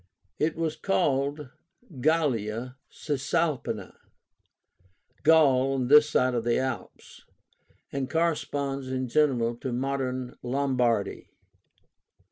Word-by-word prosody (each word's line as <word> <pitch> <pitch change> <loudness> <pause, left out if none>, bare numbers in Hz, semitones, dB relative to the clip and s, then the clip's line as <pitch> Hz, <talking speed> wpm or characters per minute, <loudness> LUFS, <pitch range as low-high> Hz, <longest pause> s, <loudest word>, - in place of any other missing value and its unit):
It 155 +1 +1
was 160 -1 -2
called 145 -5 0 0.5
GALLIA 125 -6 0 0.2
CISALPÍNA 150 0 -2 1.3
(Gaul 135 -4 +4
this 150 +4 +5
side 130 -3 +2
of 120 -2 -1
the 120 0 +1
Alps), 130 0 -5 0.7
and 135 -2 -3
corresponds 145 -5 -1
in 130 0 -2
general 120 -4 +2
to 130 +1 -5
modern 130 0 -3
Lombardy. 125 -4 0
135 Hz, 90 wpm, -27 LUFS, 125-150 Hz, 1.3 s, this